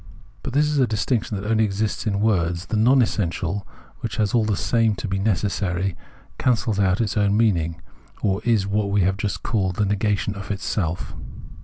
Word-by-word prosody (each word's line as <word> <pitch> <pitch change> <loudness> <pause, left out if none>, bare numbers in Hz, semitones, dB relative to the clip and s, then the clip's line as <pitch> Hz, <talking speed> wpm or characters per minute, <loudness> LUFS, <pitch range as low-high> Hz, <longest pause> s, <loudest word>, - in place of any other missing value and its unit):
But - - -5
this 145 +2 +4
is 150 -1 0
a 130 - +4
distinction 110 0 -1
that 100 - -5
only 110 0 +3
exists 105 +2 -1
in 100 -1 0
words; 90 -5 +1
the - - -3
TCOM 125 +4 +5
essential, 95 -2 -2 0.3
which - - -4
has 105 -2 0
all 120 -2 +4
the 105 -3 0
same 115 -3 +2
to 105 - -5
be 95 0 -1
necessary, 95 -2 0 0.4
cancels 115 -4 +1
its 100 +2 +1
own 100 0 +3
meaning, 85 -7 +1 0.4
or 100 -1 +1
is 115 -5 +2
what 100 +1 0
we 100 0 +2
have 95 +1 +2
just 105 -1 -3
called 95 -6 0
the 105 - +1
negation 100 0 0
of 100 -1 -8
itself. 95 -4 -2
105 Hz, 185 wpm, -23 LUFS, 95-110 Hz, 0.4 s, TCOM